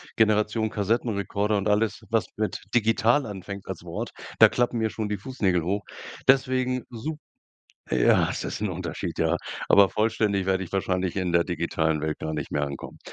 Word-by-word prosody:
Generation 110 0 +2
Kassettenrekorder 105 -1 0
und 100 +1 -1
alles, 110 +2 +1
was 115 0 +1
mit 110 -1 -2
digital 115 +4 +3
anfängt 100 -1 -7
als - - -6
Wort, - - -5 0.3
da - - +10
klappen 120 0 0
mir 110 0 +1
schon 110 -2 -3
die 105 - -1
Fußnägel 95 -6 0
hoch. 100 +4 -1 0.4
Deswegen, 130 -1 +3
sup 150 +7 -5 0.7
Ja, - - +4
es - - -3
ist - - -4
'n 105 - 0
Unterschied, 90 -2 -4
ja. - - +2 0.3
Aber 100 -1 +6
vollständig 105 -3 +1
werde 95 0 +1
ich 85 - -10
wahrscheinlich 95 -2 -1
in 95 -3 -1
der 85 0 +4
digitalen 80 -3 -1
Welt 75 0 -2
gar 80 0 -3
nicht 75 - -5
mehr 75 - 0
ankommen. 70 -1 -8
105 Hz, 175 wpm, -26 LUFS, 90-115 Hz, 0.7 s, da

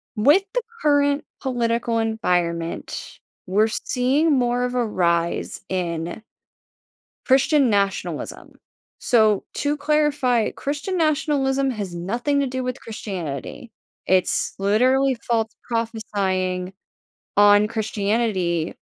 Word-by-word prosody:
With 290 - +5
the - - +1 0.2
current 285 -1 +2 0.2
political 235 -2 0
environment, 175 -7 -2 0.3
we're 210 +4 +3
seeing 260 +8 +1
more 245 -2 +1
of 250 0 -2
a 245 -2 +1
rise 170 -4 0
in 175 +2 -3 1.0
Christian 270 0 +4
nationalism. 200 -1 -2 0.5
So, 220 -5 +3
to 295 +1 -1
clarify, 290 -5 +1
Christian 295 +7 -3
nationalism 275 -4 +1
has 205 -7 -5
nothing 240 +11 -1
to 275 - +1
do 260 0 -3
with 250 -1 -4
Christianity, 195 - -6 0.4
it's 185 -1 +1
literally 255 +7 +3
false 225 -1 +1
prophesying 195 -6 -2 0.6
on 205 0 +6
Christianity 205 -6 -1
230 Hz, 100 wpm, -22 LUFS, 195-270 Hz, 1.0 s, on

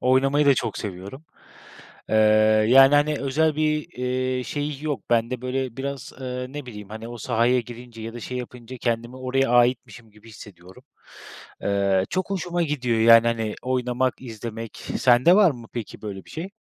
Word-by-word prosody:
Oynamayı 135 +3 +3
da 140 - +6
çok 115 -4 -3
seviyorum. 100 - -7 0.9
Eee, 110 - +2 0.5
yani 135 +3 +7
hani 150 +1 +3
özel 150 +3 +1
bir, 155 0 0
iii, 125 0 -1
şeyi 145 0 -4
yok. 145 -5 -4
Bende 120 +2 0
böyle 130 -1 -3
biraz, 140 -1 -5
eee, 125 -1 -4
ne 145 -1 -7
bileyim 105 -4 -9
hani 110 +2 -8
o 120 - -8
sahaya 120 +1 +1
girince 120 -1 -11
ya 115 +1 -7
da 120 - -7
şey 125 +3 -5
yapınca 125 0 -9
kendimi 120 +1 -2
oraya 130 0 0
aitmişim 120 -2 +1
gibi 105 +2 -18
hissediyorum. 100 0 -14 0.8
Eee, 100 -1 +1
çok 185 +1 -2
hoşuma 175 -2 -2
gidiyor 125 -7 -1
yani 115 0 +7
hani 115 -2 -1
oynamak, 125 0 -1
izlemek. 115 -2 -7 0.2
Sende 125 +8 +5
var 200 -5 +6
mı 120 -4 -11
peki 120 -3 -7
böyle 100 -3 -7
bir - - -17
şey? 165 +4 -6
125 Hz, 165 wpm, -23 LUFS, 115-135 Hz, 0.9 s, yani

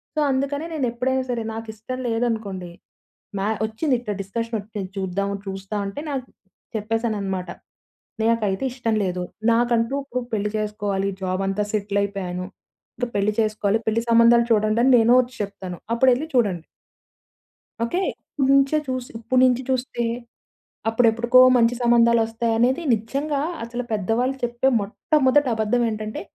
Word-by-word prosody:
So - - 0
అందుకనే 280 +3 -1
నేనేప్పుడైనా 260 -2 0
సరే 235 -2 -2
నాకిష్టం 225 +3 -6
లేదనుకోండి 220 -6 -2 0.7
మ్యా 195 +2 0 0.2
వచ్చింది 255 +6 -1
ఇట్టా 225 -4 -4
డిస్కషన్ 230 +4 -3
ఒచ్చింది 205 -2 -6
చూద్దాం 195 +1 -2 0.2
చూస్తా 195 +2 -5
అంటే 195 +8 -5
నాకు 265 -3 -3 0.5
చెప్పేసానన్నమాట. 210 -4 -2 0.7
నాకైతే 220 -2 +1
ఇష్టం 245 -3 -1
లేదు 180 -1 -2 0.3
నాకంటూ 235 +1 +2
ఇప్పుడు 250 -2 -3
పెళ్లి 210 -1 0
చేసుకోవాలి 205 -2 -1
జాబ్ 185 0 -1
అంతా 195 +2 0
సెటిల్ 200 -1 -1
అయిపోయాను. 185 -3 -3 0.5
ఇంకా 245 -1 -2
పెళ్లి 200 +1 +2
చేసుకోవాలి 215 -1 +1
పెళ్లి 220 +1 +1
సంబంధాలు 235 +1 +6
చూడండి 215 +1 +2
అని 265 - +5
నేనే 230 +2 +5
వచ్చి 250 0 -10
చెప్తాను 185 -3 -6 0.2
అప్పుడేళ్లి 255 +4 +3
చూడండి. 195 -9 +1 1.2
ఓకే. 235 +10 -1 0.4
ఇప్పుడు 270 - +3
నించే 275 +2 +4
చూసి 255 -1 -3
ఇప్పడు 255 +3 +1
నుంచే 255 0 +2
చూస్తే, 255 -2 -1 0.9
అప్పుడెప్పుడుకో 235 +2 +4 0.2
మంచి 235 0 +3
సంబంధాలొస్తాయనేది 235 +2 +3
నిజంగా 275 +7 -1 0.2
అసలు 240 +2 -4
పెద్దవాళ్ళు 225 +6 0
చెప్పే 240 +2 +1
మొట్టమొదటి 265 +6 +2
అబద్ధమేంటంటే 220 -1 -1
230 Hz, 125 wpm, -23 LUFS, 205-245 Hz, 1.2 s, సంబంధాలు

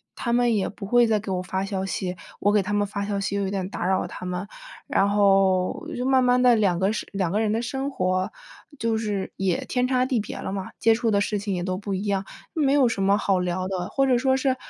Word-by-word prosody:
他 235 - -3
们 240 -1 +3
也 195 -2 0
不 200 - -8
会 240 +3 +4
再 220 -1 +2
给 200 -2 -6
我 180 - -1
发 190 +1 -3
消 195 -1 -3
息， 185 -1 -3 0.2
我 205 - +3
给 210 - +4
他 205 +2 -3
们 205 0 +2
发 200 0 -3
消 200 -1 -2
息 195 0 -2
又 200 - 0
有 190 - -1
点 190 -1 -3
打 175 - -4
扰 190 0 +1
他 - - -8
们。 180 +2 -3 0.4
然 200 +1 +2
后， 195 -2 +2
就 250 - -2
慢 260 -1 +4
慢 250 0 +3
地， 250 -1 +6
两 200 -5 +2
个 190 +3 +1
生 220 - -4
两 185 -4 -1
个 210 - +1
人 215 -1 +1
的 225 - 0
生 270 +4 -3
活， 185 -7 -1 0.5
就 230 -1 0
是 210 -3 -3
也 190 -3 0
天 250 0 0
差 255 -1 +2
地 255 -2 0
别 210 - -5
了 - - -5
嘛， 190 -1 -4
接 225 - +5
触 230 0 0
的 200 - +3
事 205 0 -1
情 200 -1 -2
也 175 - -2
都 185 0 -2
不 200 -1 -3
一 190 - -3
样， 195 -1 0 0.3
没 285 -5 +2
有 275 -4 +5
什 200 -4 -2
么 200 +1 +3
好 195 -3 +1
聊 180 +1 -2
的。 185 -1 -3
或 275 - +1
者 255 -2 +3
说 265 +1 +2
是， 265 -1 +1
200 Hz, 285 characters per minute, -24 LUFS, 190-235 Hz, 0.5 s, 地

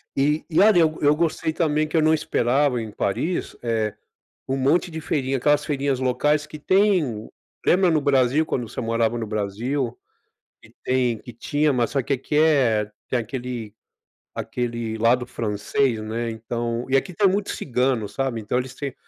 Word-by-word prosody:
e 150 +3 +1
e 155 - +2
olha, 210 -3 +6
eu 160 -2 +5
go 155 - -9
eu 145 +1 +5
gostei 165 0 0
também 155 -2 +1
que 165 - -1
eu - - +4
não 155 +1 +4
esperava 135 -3 +1
em 110 -1 -6
Paris, 155 - -2
eh, 110 -3 -1 0.6
um 135 - 0
monte 145 +7 +2
de 160 -1 -5
feirinhas, 135 -4 -1
aquelas 145 +3 +2
feirinhas 140 -2 -1
locais 145 +4 +1
que 150 - -9
tem, 170 - +2 0.4
lembra 185 0 +4
no 155 -2 +2
Brasil, 140 +1 +3
quando 120 -3 -2
você - - -5
morava 115 0 0
no 115 - -3
Brasil, 115 +5 -2 0.7
que - - -19
tem 125 -3 +1
que 120 - -11
tinha, 145 +5 0
mas 120 -2 0
só 135 - +1
que 135 - -1
aqui 135 +3 -3
é 125 -9 +3 0.2
tem 125 - +1
aquele 120 -2 -5 0.6
aquele 115 -2 -3
lado 120 +2 +3
francês, 115 +2 -1
né. 115 +2 -3
Então 115 +1 -3
e 135 - +4
aqui 180 +7 -2
tem 200 +4 +3
muitos 195 +2 -1
cigano, 125 -4 0
sabe, 130 -4 -2
então 105 +4 -1
eles 125 0 -3
têm 140 -2 -5
130 Hz, 180 wpm, -23 LUFS, 115-150 Hz, 0.7 s, olha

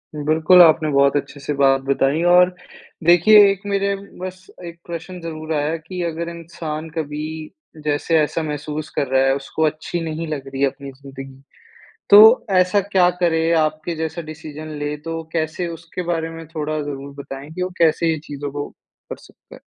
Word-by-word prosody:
बिल्कुल, 155 +4 +5
आपने 160 -2 +5
बहुत 140 0 +3
अच्छे 145 - -5
से 140 +1 -3
बात 135 -1 +3
बताई। 140 +3 +1
और 180 0 +6 0.5
देखिए 175 +6 +7
एक 195 -1 -5
मेरे 200 0 0 0.2
बस 185 0 -7 0.2
एक 170 0 -9
प्रश्न 175 +2 -7
ज़रूर 160 -1 -5
आया 150 +1 0
कि 180 +3 -7
अगर 170 0 -3
इंसान 165 -2 -7
कभी 150 -1 -3 0.6
जैसे 150 +2 +1
ऐसा 155 +2 0
महसूस 150 0 -5
कर 140 - 0
रहा 130 0 +2
है 135 0 +3
उसको 140 +3 -3
अच्छी 155 +3 -3
नहीं 160 +1 -4
लग 140 -3 -5
रही 135 0 -6
है 140 - +5
अपनी 140 +1 -7
ज़िंदगी। 135 0 -11 0.7
तो 205 +1 +10 0.4
ऐसा 185 +2 +3
क्या 190 -2 +2
करे 165 -1 +2
आपके 155 +2 -2
जैसा 160 +1 -4
डिसीज़न 155 0 -9
ले 145 0 -3
तो 165 0 -3
कैसे 160 +2 -2
उसके 165 +2 -7
बारे 165 0 -2
में 165 -1 -9
थोड़ा 155 -1 -3
ज़रूर 140 -1 -7
बताएँ 135 +2 -9
कि 180 +3 -4
वो 185 - -2
कैसे 165 0 +3
ये 160 - -3
चीज़ों 145 0 -6
को 145 0 -4 0.4
कर - - -4
सकता - - -18
है? - - -13
155 Hz, 180 wpm, -20 LUFS, 145-170 Hz, 0.7 s, तो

